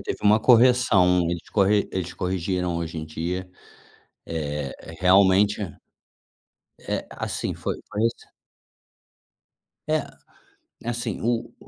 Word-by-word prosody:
teve - - -4
uma 105 +1 +5
correção, 115 -7 +5
eles 85 -1 -4
corre 100 0 +2
eles 90 -2 -3
corrigiram 90 -1 -2
hoje 85 -1 -4
em 80 - -4
dia, 90 +4 -4 0.8
eh, 75 -3 -4
re 80 - -11
realmente 95 +3 +4 1.2
é, - - -3
assim, - - -3
foi - - -3 0.2
foi 105 - -2
assim. 115 0 -2 1.6
É, - - +1 0.8
assim,o 120 0 -2
95 Hz, 105 wpm, -24 LUFS, 85-105 Hz, 1.6 s, uma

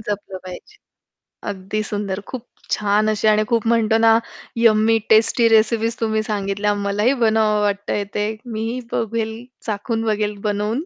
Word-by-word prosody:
जपलं 205 -3 -5
पाहिजे. 185 - -10 0.7
अगदी 200 +2 -3
सुंदर. 205 -2 -3
खूप 250 -2 -6 0.3
छान 210 +1 +1
अशी 215 0 +1
आणि 215 0 +3
खूप 230 -1 0
म्हणतो 225 -1 +3
ना, 225 - +7 0.5
यम्मी 225 0 +4
टेस्टी 225 +1 +4
रेसिपीज 225 +1 +2
तुम्ही 220 -1 0
सांगितल्या. 200 0 -1
मलाही 210 +6 +2
बनवावं 220 -1 +3
वाटतंय 205 0 -1
ते. 210 0 0 0.3
मीही 225 +3 -3
बघेल 225 0 -2 0.3
चाखून 225 +2 -2
बघेल 210 -1 -1
बनवून. 210 +6 -1
215 Hz, 140 wpm, -20 LUFS, 205-225 Hz, 0.7 s, ना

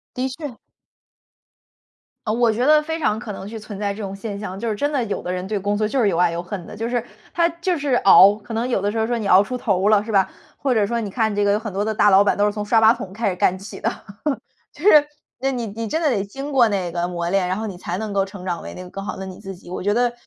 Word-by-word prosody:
的 255 +1 -1
确。 270 -2 -7 1.7
呃， 215 - +1
我 235 0 +3
觉 235 +4 0
得 305 +1 +6
非 320 +1 -3
常 215 -8 +1
可 220 -1 -6
能 195 -1 -7
是 225 +2 -7
存 210 -2 -8
在 200 -1 -1
这 210 - -8
种 195 -1 -5
现 200 +1 -6
象， 195 -2 -6
就 230 +1 -2
是 215 - -1
真 290 +8 -1
的 280 -4 0
有 205 - -3
的 180 - -4
人 185 +1 -3
对 210 +1 -1
工 205 +1 -1
作 215 0 +1
就 270 - -2
是 210 - +3
又 165 - -1
爱 175 0 +4
又 170 +1 -3
恨 185 -1 -6
的。 - - -9
就 225 +2 -3
是 240 -1 0 0.3
他 340 -1 +3
就 340 +1 -2
是 280 -3 0
熬 200 -2 +7
可 220 +2 -10
能 230 +2 -1
有 240 -6 0
的 205 +1 0
时 225 - -4
候 220 0 +1
说 240 0 0
你 220 - -4
熬 185 +2 +7
出 250 +5 -3
头 200 -5 +1
了 210 -1 +4
是 220 - -6
吧， 195 -2 +3 0.3
或 270 -3 0
者 210 -3 +3
说 235 +3 -1
你 210 - -3
看 220 +1 0
这 205 0 +1
个 200 - +3
有 210 - +1
很 215 -1 -6
多 200 +2 -1
的 220 - -1
大 210 0 +4
老 195 +1 +6
板 205 - +2
都 205 - +3
是 210 - +2
从 210 0 -4
刷 225 +2 +3
马 220 +1 +7
桶 190 -5 -8
开 220 +1 0
始 180 - -3
干 185 - +2
起 195 +3 -9
的。 - - 0 0.8
就 300 - -11
是 305 -8 +7 0.4
那 270 +1 +1
你 245 -3 -3
你 220 +2 -5
真 320 - -1
的 320 - +2
得 220 -8 +1
经 275 +8 -7
过 250 -4 +5
那 190 -4 -2
个 175 0 -1
磨 170 -1 -3
炼， 185 -1 +1
然 185 - -1
后 220 - -3
你 195 -4 -6
才 175 0 -4
能 215 -2 -4
够 195 -1 +2
成 195 -2 -10
长 175 -2 -2
为 - - -8
那 180 - -8
个 - - -10
更 195 +1 -6
好 - - -4
的 190 - -6
你 185 -1 -9
自 195 -2 -8
己， 175 - -16
我 180 - -5
觉 205 +2 +1
得 240 +2 +2
210 Hz, 335 characters per minute, -21 LUFS, 195-235 Hz, 1.7 s, 熬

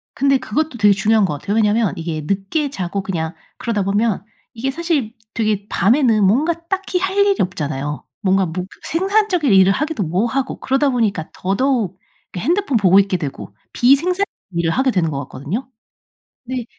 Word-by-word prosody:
근데 275 0 +3
그것도 260 +3 -2
되게 205 -2 +5
중요한 210 +2 +3
것 180 - -2
같아요. 205 +7 -2
왜냐면 215 -1 +2
이게 160 -2 -3
늦게 200 - -1
자고 195 -5 -3
그냥 165 -4 -3 0.2
그러다 225 -5 -1
보면 205 +1 0 0.3
이게 240 +4 -2
사실 295 -7 -1 0.2
되게 215 -2 -1
밤에는 225 +1 +3
뭔가 275 - +3
딱히 380 -1 -1
할 385 +2 -2
일이 400 -1 +4
없잖아요. 150 -5 -2 0.2
뭔가 190 -2 +2
뭐 180 +2 -4 0.2
생산적인 375 - +1
일을 190 0 +6
하기도 300 +1 -1
뭐하고 225 - -1
그러다 270 +2 +1
보니까 215 -10 0
더더욱 200 -1 0 0.4
핸드폰 340 - +1
보고 195 -2 +5
있게 195 -2 +1
되고 145 -5 -6 0.2
비생산적인 335 +10 +3 0.3
일을 170 -2 0
하게 260 +6 +2
되는 175 -5 +1
것 140 -3 -3
같거든요. 165 - -5 0.8
근데 250 -1 -4
220 Hz, 360 characters per minute, -19 LUFS, 190-275 Hz, 0.8 s, 일을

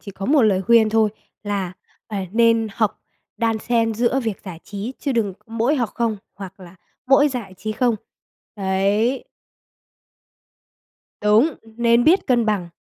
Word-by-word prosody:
chỉ 200 - -9
có 195 0 -6
một 285 -3 +4
lời 195 -3 +3
khuyên 230 0 +5
thôi, 220 -1 +2 0.3
là, 200 -3 -3 0.4
à, 200 -3 -3
nên 230 -1 +3
hợp 215 -3 0 0.4
đan 225 -2 0
xen 225 -1 0
giữa 245 +4 +1
việc 220 -5 -3
giải 170 -3 -8
trí 210 +5 -6
chứ 275 - -2
đừng 215 -5 0
mỗi 230 +6 0
học 240 -4 0
không, 230 -3 0 0.2
hoặc 195 -1 -10
là 180 0 -13 0.3
mỗi 280 +2 +5
giải 230 -8 -6
trí 215 +3 -4
không. 240 -1 +1 0.6
Đấy. 200 +6 0 2.0
Đúng, 220 +9 +4 0.2
nên 235 0 +3
biết 360 +5 +4
cân 240 -3 +2
bằng. 195 -5 0
225 Hz, 155 wpm, -21 LUFS, 200-240 Hz, 2.0 s, khuyên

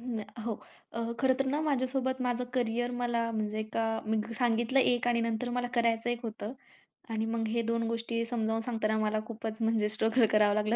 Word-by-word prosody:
हो. 230 -1 -4 0.4
अ, 230 0 -2
खरं 265 -1 +4
तर 270 - +1
ना 285 +3 +1
माझ्यासोबत 260 -3 0
माझं 250 0 0
करिअर 245 -1 0
मला 240 -1 0
म्हणजे 215 -2 -1
नाही 215 0 -1
का? 225 0 0
मी 220 0 +2 0.2
सांगितलं 240 +1 +2
एक 245 -1 +2
आणि 235 -1 +3
नंतर 230 +1 -1
मला 245 0 0
करायचं 235 0 +2
एक 240 -1 -2
होतं 220 0 -4 0.6
आणि 220 -1 0
मग 225 0 -1
हे 235 +1 +1
2 230 0 0
गोष्टी 230 0 -1
समजावून 225 -1 0
सांगताना 220 -2 0
मला 215 0 +1
खूपच 220 -1 -5
म्हणजे 225 -2 +2
स्ट्रगल 225 +3 +3
करावं 210 -1 +5
लागलं 215 +2 +2
230 Hz, 190 wpm, -31 LUFS, 220-245 Hz, 0.6 s, करावं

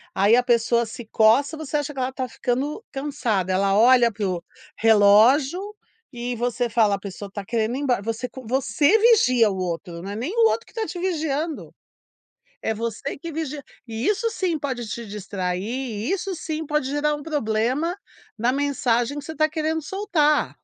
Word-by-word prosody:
aí 205 +4 +5
a 250 - +5
pessoa 235 -1 +2
se 225 +1 -9
coça 250 +8 +4
você 300 -1 -2
acha 295 0 -3
que 270 - -7
ela 255 0 0
está 260 -1 -4
ficando 270 - -2
cansada. 240 -10 -1
Ela 195 +1 +2
olha 240 0 +6
para 205 -1 -3
o 175 -2 -3 0.3
relógio 225 - +5 0.5
e 245 0 -4
você 245 +1 -1
fala: 215 -3 +3
"A - - -7
pessoa 200 0 -7
está 200 0 -7
querendo 230 +1 -1
ir - - -3
embora". 250 -7 +1
Você, 230 +3 -3 0.2
você 285 - +3
vigia 330 - +5
o 190 - -4
outro, 170 -1 -4
não 195 - -7
é - - -5
nem 265 - -3
o 455 -1 +5
outro 460 - -2
que - - -20
está 450 -1 -3
te 355 - -6
vigiando. 320 -3 -2 0.9
É 220 - 0
você 230 +5 -4
que 335 +3 -7
vigia, 300 -2 -4 0.2
e 225 +2 -4
isso 450 +2 +1
sim 360 -7 -1
pode 255 -5 -4
te 235 +1 -5
distrair, 190 -3 -3
e 235 - -3
isso 390 -1 -2
sim 315 -1 -4
pode 295 -3 0
gerar 295 +1 0
um 295 - -6
problema 280 +3 0 0.4
na 240 +3 +2
mensagem 270 -2 0
que 290 - -7
você 320 - -6
está 310 0 +2
querendo 315 0 -1
soltar. 335 -5 +1
255 Hz, 185 wpm, -23 LUFS, 220-300 Hz, 0.9 s, olha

